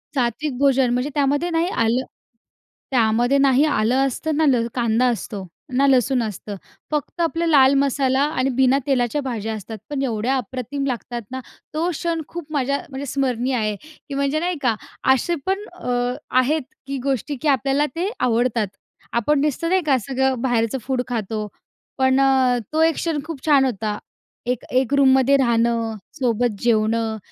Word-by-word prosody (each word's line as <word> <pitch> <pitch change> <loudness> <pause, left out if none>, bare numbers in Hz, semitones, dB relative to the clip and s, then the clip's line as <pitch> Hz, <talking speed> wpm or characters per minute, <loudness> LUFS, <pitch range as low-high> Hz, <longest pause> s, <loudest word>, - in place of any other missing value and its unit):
सात्विक 260 +3 -1
भोजन 270 -2 +3
म्हणजे 250 +4 0
त्यामध्ये 290 +4 +1
ना 325 -1 0
हे 340 - +1 0.2
आलं 240 +4 +1 0.9
त्यामध्ये 240 +2 +3
ना 275 -1 +4
हे 265 +3 +4
आलं 245 -4 +1
असतं, 305 +4 -2
ना 315 - +3
ल 245 -4 +3
कांदा 235 0 +2
असतो, 210 -4 -4 0.3
ना 275 +1 +4
लसूण 255 -1 +3
असतं, 210 -1 -5 0.4
फक्त 300 +3 -2
आपलं 335 0 0
लाल 275 -3 +6
मसाला 270 -1 +1 0.2
आणि 260 +1 +2
बिना 265 0 +4
तेलाच्या 265 +1 +1
भाज्या 225 -4 -3
असतात. 215 +1 -7
पण 285 -2 -2
एवढ्या 240 +1 0
अप्रतिम 260 +2 -4
लागतात 240 -1 -4
ना. 260 - -4 0.3
तो 330 +3 0
क्षण 335 0 -2
खूप 335 -3 -8
माझ्या 280 -1 +1
म्हणजे 270 0 -5
स्मरणीय 260 -1 -1
आहे, 215 -1 -1 0.3
की - - -5
म्हणजे 280 +2 0
नाही 350 0 -1
का 240 -4 +2 0.4
असे 340 +6 0
पण 390 +2 -1 0.2
अ, 245 0 0 0.3
आहेत 295 +5 +2 0.3
की 275 0 -3
गोष्टी 275 +1 -1
की 310 - -1
आपल्याला 275 +2 +2
ते 365 +4 -1
आवडतात. 235 -2 +1 0.5
आपण 275 +5 +2
नुसतं 300 +3 0
नाही 375 0 +3
का 270 -3 +4
सगळं 265 -2 0
बाहेरचं 240 -1 +1
फूड 260 -1 -1
खातो. 215 -3 -3 0.5
पण 260 0 +3
अ, 260 -2 +3 0.2
तो 315 - +2
एक 325 -1 +3
क्षण 325 -3 -1
खूप 320 -4 -7
छान 285 -3 +5
होता. 215 -4 -2 0.5
एक 250 -1 -2
एक 260 +1 +2
रूममध्ये 265 0 +5
राहणं, 230 -2 +1 0.2
सोबत 245 -5 0
जेवणं, 225 -1 +1
265 Hz, 165 wpm, -21 LUFS, 235-285 Hz, 0.9 s, लाल